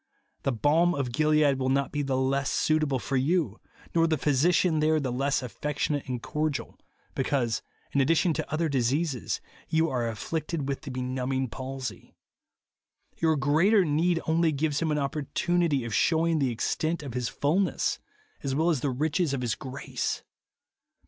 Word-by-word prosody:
The 135 - 0
balm 155 +9 +3
of 135 -3 -2
Gilead 150 0 +3
will 130 0 0
not 140 0 +1
be 145 - -1
the 135 -2 0
less 135 +1 +1
suitable 155 -3 +1
for 135 +2 -2
you, 140 - +1 0.3
nor 165 -1 +4
the 160 -1 +1
physician 155 +4 +3
there 155 +1 +3
the 135 -4 -2
less 135 +2 0
affectionate 145 +3 -2
and 125 -1 -2
cordial, 150 -2 -2 0.3
because, 130 -4 0 0.3
in 140 - +2
addition 165 +4 +3
to 155 0 -4
other 160 +2 +1
diseases, 135 0 0 0.3
j^ou 160 +1 +2
are 120 -3 0
afflicted 150 - -3
with 140 -1 -2
the 150 - -8
be 130 0 -3
numbing 130 0 -1
palsy. 130 +2 -6 1.0
Your 160 -1 +2
greater 165 +9 +4
need 165 +3 +2
only 160 0 +2
gives 150 +1 0
him 165 - +1
an 150 - +1
opportunity 150 +1 0
of 115 - -4
shewing 165 +3 +2
the 135 -3 +2
extent 155 +7 -1
of 135 -5 -6
his 125 -2 -1
fulness, 165 +3 0 0.4
as 135 -1 -2
well 160 +4 +3
as 150 - 0
the 140 - 0
riches 150 +3 0
of 130 - -3
his 120 -2 0
grace. 130 0 -4
145 Hz, 165 wpm, -27 LUFS, 130-160 Hz, 1.0 s, nor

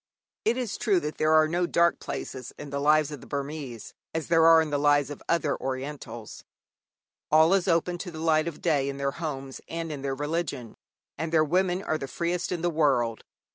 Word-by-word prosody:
It 230 +3 +2
is 245 -5 -3
true 200 -6 +3
that 150 +1 -5
there 155 0 +3
are 155 0 +6
no 175 +2 0
dark 170 0 +3
places 125 -2 -6
in 145 -1 -8
the 140 - -2
lives 150 0 +3
of 145 - -7
the - - -13
Burmese 140 -4 -5 0.2
as 160 -2 -3
there 165 -1 +5
are 165 0 +8
in 160 -2 0
the 145 - +1
lives 145 -1 +3
of 145 - -8
other 165 -3 +1
Orientals. 130 -4 -6 0.9
All 160 +3 +5
is 195 -2 +2
open 175 +1 +1
to 180 - -5
the 165 - -9
light 155 0 +2
of 170 - -6
day 145 -5 +2
in 140 - -5
their 140 0 -1
homes 135 -4 -5
and 165 -1 -4
in 145 -2 -5
their 135 -1 -2
religion, 145 -4 -3 0.5
and 160 0 -2
their 155 -1 +4
women 180 +3 +1
are 155 - -1
the 135 - -5
freest 170 +4 -2
in 175 -2 -3
the 175 - +2
world. 130 -8 +1
155 Hz, 215 wpm, -27 LUFS, 140-170 Hz, 0.9 s, are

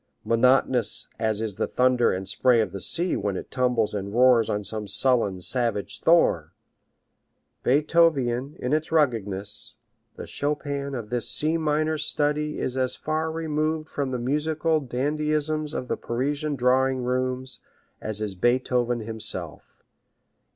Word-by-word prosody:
Monotonous 125 +2 +2
as 110 -1 0
is 110 -4 -4
the - - 0
thunder 125 -1 +2
and 95 +1 -4
spray 125 +4 +3
of 110 - 0
the 100 - -7
sea 175 - 0
when 100 -2 -2
it - - -8
tumbles 125 -4 +1
and 100 -1 -4
roars 125 -2 +5
on 105 0 -1
some 105 +1 -3
sullen, 105 -2 +3
savage 115 +1 -2
shore. 125 - +3 1.1
Beethov 155 +4 +4
ian, 125 +3 -2
in 125 +3 -2
its 155 +1 0
ruggedness, 105 -9 0 0.4
the - - -7
Chopin 140 -1 -2
of 115 -3 -6
this 120 -2 0
C 155 +2 +1
minor 155 0 0
study 150 0 0
is 130 - -2
as 130 -1 0
far 155 +1 -2
removed 155 -1 -2
from 140 -2 -2
the 130 - -2
musical 155 +5 0
dandyisms 150 +3 -1
of 125 - -4
the - - -2
Parisian 145 +5 -2
drawing 130 0 +2
rooms 130 +1 -2 0.4
as 110 -1 -2
is 105 -2 -3
Beethoven 120 +3 +1
himself. 110 0 -6
130 Hz, 145 wpm, -25 LUFS, 115-150 Hz, 1.1 s, roars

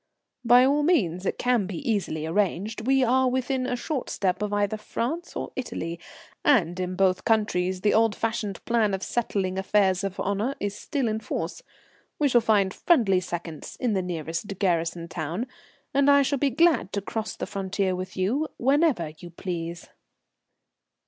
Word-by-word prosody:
"By 245 +2 +7
all 285 +2 +3
means. 195 - +1
It - - -1
can 245 -6 +1
be 185 -3 -5
easily 185 -8 -1
arranged. 205 +5 -1
We 270 0 +4
are 255 +1 +3
within 260 0 -1
a 250 - -1
short 265 +2 -3
step 190 0 -1
of 210 -1 -1
either 205 0 +1
France 250 +10 -4
or - - -4
Italy, 170 -10 -4 0.4
and 185 - +3
in 185 0 -2
both 185 -1 +2
countries 190 -4 +1
the 210 - +3
old 225 -1 +3
fashioned 215 -3 -3
plan 225 -4 +2
of 190 - -6
settling 195 -5 -1
affairs 190 -1 +2
of 195 -1 -4
honour 205 +7 -1
is 205 -1 -2
still 275 +2 -2
in 220 0 -1
force. 220 - -4 0.6
We 290 -2 +2
shall 240 -2 +5
find 205 -4 +2
friendly 220 - +3
seconds 170 -3 -6
in 245 -4 +1
the 190 - +1
nearest 175 +2 -4
garrison 170 -3 0
town, 165 +7 -3 0.5
and 280 +1 +4
I 280 0 +6
shall 275 0 0
be 285 - +2
glad 275 - +3
to 200 - -1
cross 220 +2 -4
the - - -4
frontier 195 -1 -1
with 185 +1 -6
you 240 +12 +1
whenever 270 - +2
you 175 - -9
please." 170 -1 -5
205 Hz, 170 wpm, -26 LUFS, 185-250 Hz, 0.6 s, By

